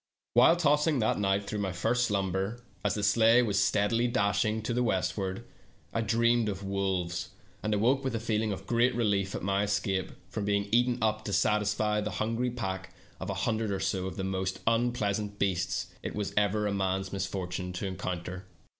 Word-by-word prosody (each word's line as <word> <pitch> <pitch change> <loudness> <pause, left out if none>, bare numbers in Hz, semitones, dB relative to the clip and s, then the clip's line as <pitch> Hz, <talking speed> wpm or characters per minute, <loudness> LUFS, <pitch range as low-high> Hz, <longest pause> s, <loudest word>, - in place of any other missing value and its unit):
While 125 +8 +7
tossing 150 -2 +3
that 110 -3 +1
night 100 0 +1
through 105 +1 -3
my 100 -2 -1
first 115 +8 +1
slumber, 100 +3 -1 0.2
as - - +1
the 105 - -2
sleigh 115 +4 +5
was 100 -3 +2
steadily 115 +4 +2
dashing 110 -1 +1
to 120 - -1
the 125 - +1
westward, 95 -2 -1 0.5
I 115 - +1
dreamed 115 0 +2
of 100 -1 -5
wolves, 95 -3 -1 0.3
and 110 - -1
awoke 120 +7 +2
with 130 -3 -1
a - - -1
feeling 110 -1 0
of 95 0 -5
great 120 +3 +2
relief 100 -4 +1
at - - -5
my 100 +1 +1
escape 100 -2 0 0.2
from 100 +3 -4
being 100 0 +1
eaten 120 +1 +3
up 110 0 +1
to 100 - -3
satisfy 105 0 +2
the 105 -1 -3
hun 110 +2 -1
ger 125 +2 0
of - - -1
a - - -10
pack 95 -5 -4 0.2
of - - -5
a - - -2
hundred 110 -1 0
or 100 -1 -1
so 95 -1 -1
of 95 - -7
the 95 - -2
most 95 0 -2
unpleasant 110 -3 0
beasts 90 -3 -1
it - - -5
was 105 -1 -3
ever 105 +1 +2
a 100 - 0
man's 95 0 -1
misfortune 95 -1 -3
to 90 - -4
encounter. 90 -1 -4
105 Hz, 200 wpm, -29 LUFS, 95-115 Hz, 0.5 s, While